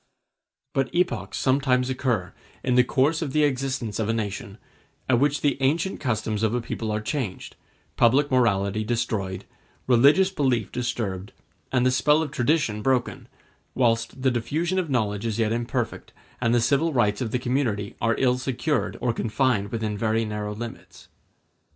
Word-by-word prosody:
But 135 -1 0
epochs 120 - 0
sometimes 130 -1 +2
occur, 120 -9 -1 0.3
in 125 - +1
the 125 0 +6
course 145 +6 +1
of 145 -5 -3
the 155 - +3
existence 130 -6 -1
of 110 -1 -1
a - - +2
nation, 100 -2 -4 0.5
at 120 -2 +3
which 145 +1 +1
the 140 -2 0
ancient 160 +8 +1
customs 110 -4 -1
of 110 +1 +1
a - - +1
people 115 -1 -4
are 105 - 0
changed, 110 -4 -4 0.4
public 135 +5 +4
morality 110 -4 +2
destroyed, 110 -5 -2 0.4
religious 140 +10 +5
belief 130 - 0
disturbed, 105 -6 -3 0.4
and 125 -1 +2
the 130 - +4
spell 150 +5 +3
of 145 - -5
tradition 135 -5 +1
broken, 125 0 0 0.5
whilst 115 +1 0
the 130 - +4
diffusion 155 +10 -1
of 175 -4 -2
knowledge 105 -6 0
is 110 -1 -2
yet 110 -2 +1
imperfect, 120 +1 -3 0.3
and 120 -1 +2
the 120 - +3
civil 140 +8 +2
rights 105 -6 +1
of 120 - -1
the 125 - 0
community 120 -5 -1
are 115 0 +2
ill 125 -1 +2
secured, 135 +2 -1
or 120 -2 +1
confined 115 -3 0
within 110 -2 -2
very 110 +1 0
narrow 105 -1 -4
limits. 115 +1 -9
120 Hz, 165 wpm, -25 LUFS, 110-135 Hz, 0.5 s, the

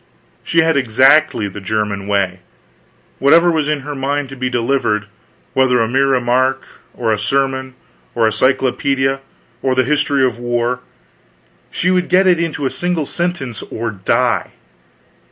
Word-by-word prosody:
She 165 - +2
had 160 -2 +2
exactly 130 0 +3
the 100 +1 -8
German 105 -1 -2
way; 95 -3 0 0.8
whatever 165 +5 +5
was 155 -3 0
in 150 -2 -1
her 145 +2 -6
mind 140 0 -2
to 135 - -8
be 130 -1 -2
delivered, 115 -4 0 0.5
whether 130 -2 +3
a 115 - +2
mere 135 +4 +2
remark, 130 0 +1 0.3
or 115 -2 -1
a 105 - 0
sermon, 130 0 -1 0.4
or 115 -1 +2
a 110 - +2
cyclopedia, 135 +1 +1 0.4
or 130 -1 0
the 130 - +3
history 145 0 +1
of 120 -2 -2
a - - -11
war, 120 +1 -1 0.9
she 180 - 0
would 180 -1 0
get 185 +1 +4
it 180 -2 +4
into 160 -4 -2
a 130 - 0
single 175 -3 -2
sentence 170 - -3
or 115 0 -5
die. 95 -2 0
130 Hz, 155 wpm, -17 LUFS, 120-145 Hz, 0.9 s, whatever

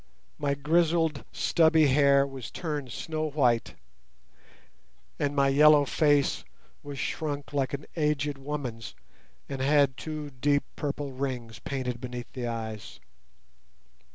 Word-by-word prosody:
My 140 -1 0
grizzled 160 0 +1
stubby 160 -2 +4
hair 140 0 +5
was 135 -4 -7
turned 150 -7 -4
snow 155 +3 -3
white, 125 -6 +1 1.4
and 145 0 0
my 140 -1 +4
yellow 150 +1 +6
face 145 -2 +2 0.4
was 145 -1 -8
shrunk 145 0 -3
like 135 -2 0
an 140 - -9
aged 150 -3 0
woman's 135 -5 -5 0.5
and 135 - -5
had 140 -1 +3
two 155 -2 -6
deep 145 +2 +1
purple 145 -1 -3
rings 130 -4 -4
painted 125 -3 -4
beneath 125 -1 -7
the 125 -3 -4
eyes. 110 -3 -6
140 Hz, 120 wpm, -28 LUFS, 130-150 Hz, 1.4 s, yellow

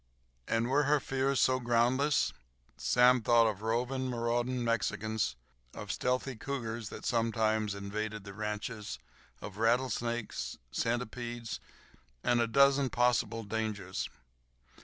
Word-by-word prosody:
And 115 +1 +1
were 140 +3 +3
her 145 +1 +4
fears 135 -1 0
so 130 0 +3
groundless? 125 +4 +2 0.4
Sam 125 0 +4
thought 115 +1 +5
of 105 -2 -1
roving, 125 +4 -1
marauding 120 +1 0
Mexicans, 110 - 0 0.4
of - - -5
stealthy 125 +1 -1
cougars 115 -3 -4
that - - -8
sometimes 110 -3 +1
invaded 105 +1 -4
the 100 -1 -9
ranches, 105 - -4 0.4
of 100 -1 -8
rattlesnakes, 120 0 0
centipedes, 120 0 -3 0.6
and 120 -1 +3
a 115 - +2
dozen 140 +3 +4
possible 120 -2 +1
dangers. 105 -3 -3
115 Hz, 115 wpm, -32 LUFS, 110-125 Hz, 0.6 s, thought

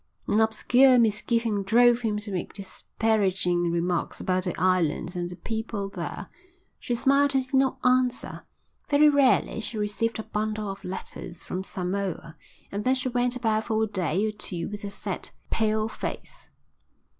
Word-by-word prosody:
An 215 - +2
obscure 245 +4 +5
misgiving 225 -1 +1
drove 240 +4 +4
him 215 -3 0
to 210 0 -4
make 180 -2 -4
disparaging 190 -4 0
remarks 170 +1 -1
about 185 0 0
the 180 - -3
island 180 -1 +1
and 175 0 -2
the 180 - -8
people 220 +1 -4
there. - - -6 0.5
She 240 - -2
smiled 275 +3 +3
and 265 -1 +2
did 260 - -16
not 265 0 +3
answer. 255 0 +1 0.5
Very 295 +1 +6
rarely 280 -5 +3
she 220 +1 -5
received 210 +2 -1
a 220 - -4
bundle 215 -1 -3
of 195 - -10
letters 180 -2 -7
from 185 +1 -4
Samoa 185 -3 -4 0.4
and 205 +1 -3
then 255 +3 +3
she 255 0 -1
went 245 0 0
about 220 -3 0
for 220 -1 +1
a - - +3
day 190 -2 0
or 215 - 0
two 185 -5 -4
with 205 0 -7
a 200 - -4
set, 200 - -5 0.2
pale 215 0 +1
face. - - -7
215 Hz, 165 wpm, -26 LUFS, 185-240 Hz, 0.5 s, Very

